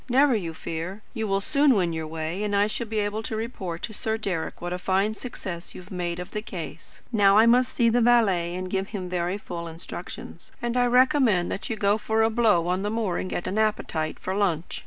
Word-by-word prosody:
Never 265 +1 +5
you 170 -6 -3
fear. 175 +8 -5
You 220 -3 -2
will 195 0 +1
soon 280 +3 +4
win 175 -4 +1
your 160 -1 -3
way, 160 +4 -4
and 205 -1 0
I 200 +1 +4
shall 220 +2 -3
be 220 0 -3
able 210 +1 0
to 220 - -4
report 205 -7 -4
to 220 - -4
Sir 220 +1 -1
Deryck 185 -7 -3
what 175 0 -4
a 180 - -3
fine 195 +3 +1
success 185 -7 -7
you - - -7
have 185 +3 -16
made 175 -2 -3
of 180 +2 -7
the 210 - -3
case. 170 -6 -8
Now 200 -3 +5
I 220 - +7
must 245 +2 +4
see 235 - +2
the 235 +1 +3
valet 195 -8 +3
and 185 0 -3
give 190 +1 -1
him 190 -4 -5
very 180 +1 -1
full 170 -4 -6
instructions. 165 0 -8
And 240 0 -2
I 245 0 +3
recommend 250 -7 +4
you - - -2
to 225 - -4
go 205 0 +2
for 220 +1 +1
a 225 - +3
blow 215 -7 +3
on 180 +2 0
the 205 - -1
moor 215 -5 -1
and 185 - -3
get - - -3
an 205 - -1
appetite 170 -7 0
for 185 - -3
lunch. 185 -5 -1
200 Hz, 240 wpm, -26 LUFS, 175-225 Hz, -, I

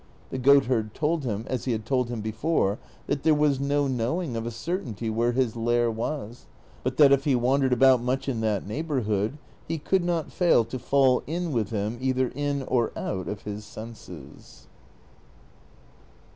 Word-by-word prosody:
The 130 - -3
goatherd 125 -5 +3
told 155 -1 0
him, 110 -2 -2
as 130 - -3
he 125 - +1
had 110 -1 -4
told 125 -1 0
him 120 -3 -4
before, 110 -1 0 0.3
that 140 -1 -1
there 155 0 +4
was 150 -2 +2
no 140 +1 +1
knowing 130 +3 -1
of 115 0 -3
a - - -1
certainty 115 - -4
where 120 +2 +1
his 125 -3 0
lair 120 0 +1
was; 120 +1 -5 0.3
but 130 0 -3
that 145 -2 +7
if 140 0 +3
he 140 -3 +3
wandered 130 +2 +2
about 130 0 +5
much 130 +3 -1
in 120 -5 -1
that 105 -3 0
neighborhood 115 -3 -1 0.3
he 165 - -2
could 185 +4 +1
not 170 -2 -1
fail 170 -10 +3
to 130 - -6
fall 130 -1 +3
in 170 +2 -2
with 115 -6 0
him 110 +2 -3
either 130 -1 +1
in 145 0 -2
or 125 -3 0
out 95 -1 -3
of 105 0 -5
his 105 0 -6
senses. 105 - -11
125 Hz, 175 wpm, -26 LUFS, 115-140 Hz, 0.3 s, that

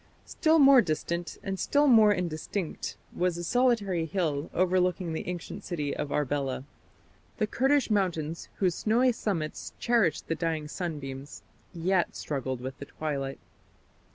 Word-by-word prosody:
Still 320 0 +2
more 275 -3 +8
distant, 170 0 -3
and 195 -1 -3
still 290 +1 +3
more 220 -6 +7
indistinct, 175 -1 -3 0.2
was 180 -1 0
a 175 - -4
solitary 205 -6 +2
hill 155 -5 -1
overlooking 180 -1 +1
the 160 - -4
ancient 180 -2 -5
city 150 -5 -3
of 145 - -3
Arbela. 140 -2 -1 0.7
The 215 - +2
Kurdish 270 +3 +2
mountains, 170 -6 -1
whose 185 -3 +1
snowy 240 +7 +3
summits 180 -9 -3
cherished 230 -10 +1
the - - 0
dying 160 -2 -2
sunbeams, 145 -5 -6 0.3
yet 180 +1 0
struggled 130 -3 -3
with 130 +2 -6
the 140 - -6
twilight. 140 -3 -4
175 Hz, 135 wpm, -28 LUFS, 150-205 Hz, 0.7 s, more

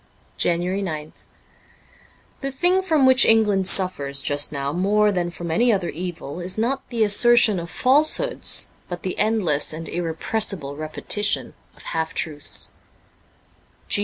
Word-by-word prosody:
JANUARY 175 +3 -1
9th 155 -5 -5 1.3
THE 275 - -3
thing 355 +8 +1
from 315 -7 +2
which 260 0 +6
England 210 -4 +3
suffers 140 -9 +1
just 145 +1 0
now 140 -1 -3
more 205 +4 +2
than 175 -3 -2
from 170 -1 -6
any 235 +9 +2
other 190 -5 -1
evil 170 -2 -7
is 180 +2 -5
not 250 +5 -2
the 235 -3 0
assertion 215 -1 +4
of 170 0 -7
falsehoods, 305 - +3 0.2
but 175 -1 -7
the 185 - -3
endless 200 -9 +1
and 165 +1 -7
irrepressible 170 -2 -2
repetition 155 +7 -2 0.2
of - - -15
half 160 0 -4
truths. 150 -2 -2
185 Hz, 135 wpm, -22 LUFS, 160-225 Hz, 1.3 s, which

